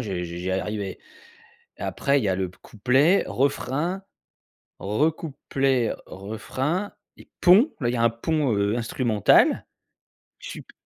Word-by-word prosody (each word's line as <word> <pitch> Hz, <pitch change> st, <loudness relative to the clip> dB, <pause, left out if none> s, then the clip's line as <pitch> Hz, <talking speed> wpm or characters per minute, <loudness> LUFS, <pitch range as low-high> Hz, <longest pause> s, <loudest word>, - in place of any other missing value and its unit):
je 105 Hz, -6 st, -4 dB
je 90 Hz, -, -3 dB
je 85 Hz, 0 st, -7 dB
j'y 90 Hz, +1 st, -3 dB
arrivais. 95 Hz, 0 st, -3 dB, 0.8 s
Après, 140 Hz, 0 st, 0 dB
il -, -, -3 dB
y -, -, +1 dB
a 95 Hz, -, +2 dB
le 95 Hz, -1 st, -2 dB
p 90 Hz, -, -22 dB
couplet, 130 Hz, -, +2 dB
refrain, 145 Hz, +7 st, -1 dB, 0.8 s
re 110 Hz, +11 st, +1 dB
couplet, 135 Hz, -5 st, -1 dB
refrain 130 Hz, -, -3 dB, 0.2 s
et -, -, -16 dB
pont. 205 Hz, -, +6 dB
Là, 120 Hz, -, 0 dB
il 120 Hz, -, 0 dB
y -, -, 0 dB
un 115 Hz, 0 st, +3 dB
pont, 140 Hz, +2 st, 0 dB
heu, 100 Hz, +3 st, +1 dB
instrumental. 115 Hz, -3 st, +3 dB, 0.7 s
Je -, -, -9 dB
suis -, -, -7 dB
p -, -, -19 dB
120 Hz, 155 wpm, -24 LUFS, 100-145 Hz, 0.8 s, pont